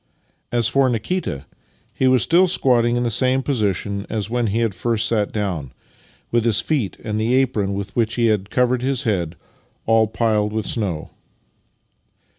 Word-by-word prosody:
As 120 Hz, -2 st, +1 dB
for 135 Hz, +1 st, +2 dB
Nikita, 115 Hz, -, -2 dB, 0.5 s
he 130 Hz, -, +1 dB
was 130 Hz, -2 st, +4 dB
still 180 Hz, +3 st, +4 dB
squatting 120 Hz, -8 st, +2 dB
in 120 Hz, -, 0 dB
the 120 Hz, -, 0 dB
same 130 Hz, +3 st, +2 dB
position 100 Hz, -6 st, -1 dB
as 110 Hz, 0 st, -3 dB
when 120 Hz, -1 st, 0 dB
he 105 Hz, +2 st, -1 dB
had 115 Hz, -4 st, 0 dB
first 115 Hz, +2 st, 0 dB
sat 105 Hz, -3 st, 0 dB
down, 90 Hz, -, -3 dB, 0.6 s
with 120 Hz, -1 st, +2 dB
his 115 Hz, -2 st, +3 dB
feet 125 Hz, -4 st, -1 dB
and 110 Hz, 0 st, -2 dB
the 120 Hz, +3 st, +1 dB
apron 110 Hz, -7 st, +1 dB
with 100 Hz, 0 st, -6 dB
which 115 Hz, -1 st, 0 dB
he 120 Hz, -, +1 dB
had 105 Hz, -3 st, +1 dB
covered 125 Hz, +1 st, +1 dB
his 130 Hz, 0 st, -1 dB
head 90 Hz, -, -1 dB, 0.5 s
all 110 Hz, -1 st, +4 dB
piled 105 Hz, -1 st, 0 dB
with 110 Hz, -1 st, -2 dB
snow. 95 Hz, -9 st, -3 dB
115 Hz, 170 wpm, -21 LUFS, 105-125 Hz, 0.6 s, was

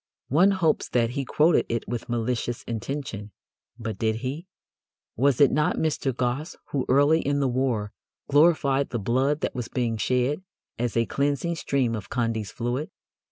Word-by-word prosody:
One 175 Hz, +9 st, +5 dB
hopes 180 Hz, -6 st, +1 dB
that 115 Hz, -1 st, +1 dB
he 135 Hz, +1 st, -3 dB
quoted 155 Hz, +6 st, +3 dB
it 115 Hz, -1 st, -2 dB
with 120 Hz, +1 st, -4 dB
malicious 120 Hz, 0 st, -2 dB
intention. 115 Hz, -3 st, -5 dB, 0.5 s
But 110 Hz, -2 st, -5 dB
did 110 Hz, -1 st, +1 dB
he? 150 Hz, +8 st, -4 dB, 0.7 s
Was 135 Hz, +1 st, +2 dB
it 140 Hz, -, +6 dB
not 155 Hz, +4 st, +2 dB
Mr. 150 Hz, -3 st, 0 dB
Gosse 125 Hz, +5 st, -2 dB, 0.2 s
who 135 Hz, -3 st, -1 dB
early 145 Hz, +5 st, +4 dB
in 145 Hz, +1 st, 0 dB
the 140 Hz, -, +2 dB
war 120 Hz, -5 st, 0 dB, 0.4 s
glorified 145 Hz, -2 st, +3 dB
the 120 Hz, -, -2 dB
blood 130 Hz, +8 st, +1 dB
that -, -, -1 dB
was 125 Hz, -3 st, -4 dB
being 120 Hz, -3 st, -1 dB
shed 125 Hz, -, 0 dB, 0.4 s
as 120 Hz, -1 st, -1 dB
a 115 Hz, -, +3 dB
cleansing 145 Hz, +6 st, 0 dB
stream 135 Hz, -7 st, 0 dB
of 110 Hz, -4 st, -5 dB
Condy's 115 Hz, -4 st, -1 dB
Fluid? 125 Hz, +8 st, -3 dB
130 Hz, 160 wpm, -25 LUFS, 115-145 Hz, 0.7 s, it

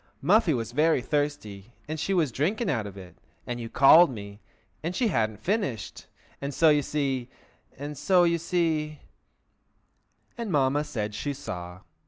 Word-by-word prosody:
"Muffy 190 Hz, +4 st, +3 dB
was 115 Hz, -1 st, -4 dB
very 155 Hz, +3 st, +3 dB
thirsty, 125 Hz, -7 st, -3 dB
and 155 Hz, +1 st, -4 dB
she 195 Hz, -, -2 dB
was 165 Hz, -8 st, +2 dB
drinking 190 Hz, -, 0 dB
out 110 Hz, -7 st, -2 dB
of 100 Hz, -1 st, -10 dB
it, 90 Hz, -3 st, -12 dB, 0.3 s
and 120 Hz, 0 st, -4 dB
you 115 Hz, -, -6 dB
called 155 Hz, +8 st, +7 dB
me, 100 Hz, -4 st, -8 dB, 0.4 s
and 170 Hz, +3 st, -3 dB
she 240 Hz, -4 st, +1 dB
hadn't 110 Hz, -, 0 dB
finished, 190 Hz, -, -2 dB, 0.3 s
and 140 Hz, -1 st, -4 dB
so, 165 Hz, -, +5 dB
you 150 Hz, -1 st, +4 dB
see—and 140 Hz, +1 st, -5 dB
so, 180 Hz, +5 st, +3 dB
you 170 Hz, -1 st, +2 dB
see—" 160 Hz, -3 st, -1 dB, 1.4 s
And 230 Hz, -4 st, -3 dB
Mamma 145 Hz, 0 st, +2 dB
said 105 Hz, -5 st, -4 dB
she 140 Hz, +7 st, -3 dB
saw. 90 Hz, -9 st, -7 dB
145 Hz, 155 wpm, -27 LUFS, 115-165 Hz, 1.4 s, called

